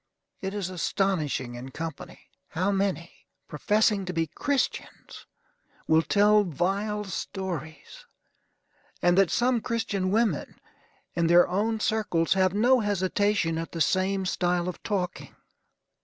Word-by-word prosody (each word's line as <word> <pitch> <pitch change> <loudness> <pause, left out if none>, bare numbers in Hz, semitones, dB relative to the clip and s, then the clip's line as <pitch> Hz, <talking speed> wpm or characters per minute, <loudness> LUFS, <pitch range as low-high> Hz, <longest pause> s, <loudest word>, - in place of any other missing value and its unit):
It 195 +1 -4
is 190 -3 -3
astonishing 155 -7 -1
in 120 +2 -8
company, 160 +2 -7 0.3
how 185 +4 -1
many, 190 -4 -3 0.2
professing 205 +6 +1
to 180 - -4
be 165 -1 0
Christians, 265 - -3 0.6
will 160 0 +5
tell 210 +4 +4
vile 200 +5 -1
stories; 190 - -6 1.0
and 175 0 +4
that 195 -2 +4
some 245 -1 +1
Christian 205 -5 -2
women, 210 - 0 0.5
in 170 -1 +1
their 175 +1 +6
own 215 +5 -1
circles, 210 -7 +1
have 190 -1 +2
no 250 +5 +4
hesitation 205 -4 0
at 165 - -6
the 165 - -4
same 190 +4 +1
style 180 -1 0
of 180 - -6
talking. 190 -4 -3
190 Hz, 125 wpm, -27 LUFS, 170-210 Hz, 1.0 s, their